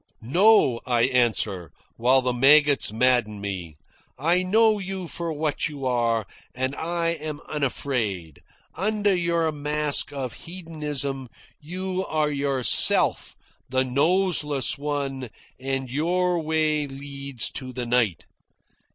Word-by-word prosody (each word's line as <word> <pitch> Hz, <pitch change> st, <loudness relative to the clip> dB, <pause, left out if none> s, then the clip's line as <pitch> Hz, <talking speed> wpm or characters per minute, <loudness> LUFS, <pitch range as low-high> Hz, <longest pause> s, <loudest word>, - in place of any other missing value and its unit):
"No," 170 Hz, -, +4 dB
I 120 Hz, -2 st, +2 dB
answer, 115 Hz, -8 st, +1 dB, 0.3 s
while 130 Hz, +3 st, +3 dB
the 125 Hz, 0 st, 0 dB
maggots 145 Hz, +1 st, +5 dB
madden 115 Hz, -2 st, +1 dB
me. 90 Hz, -6 st, -6 dB, 0.4 s
"I 170 Hz, +6 st, +2 dB
know 215 Hz, +3 st, +3 dB
you 190 Hz, -2 st, -5 dB
for 170 Hz, 0 st, -4 dB
what 155 Hz, +1 st, -1 dB
you 140 Hz, -3 st, -7 dB
are, 115 Hz, -3 st, +1 dB, 0.3 s
and 130 Hz, +1 st, -1 dB
I 170 Hz, +1 st, -1 dB
am 155 Hz, -2 st, -5 dB
unafraid. 120 Hz, -, -2 dB, 0.3 s
Under 205 Hz, +2 st, +1 dB
your 170 Hz, -2 st, +1 dB
mask 150 Hz, 0 st, 0 dB
of 135 Hz, -4 st, -4 dB
hedonism 150 Hz, -6 st, -3 dB, 0.3 s
you 185 Hz, +4 st, -4 dB
are 155 Hz, -1 st, 0 dB
yourself 140 Hz, -3 st, +2 dB, 0.3 s
the 130 Hz, 0 st, +2 dB
Noseless 150 Hz, 0 st, +1 dB
One 140 Hz, -3 st, -3 dB, 0.3 s
and 135 Hz, -1 st, -3 dB
your 175 Hz, +5 st, +1 dB
way 155 Hz, -1 st, 0 dB
leads 140 Hz, -2 st, -5 dB
to 130 Hz, -1 st, -6 dB
the 125 Hz, -1 st, -4 dB
Night. 115 Hz, -8 st, +1 dB
140 Hz, 115 wpm, -24 LUFS, 125-165 Hz, 0.4 s, maggots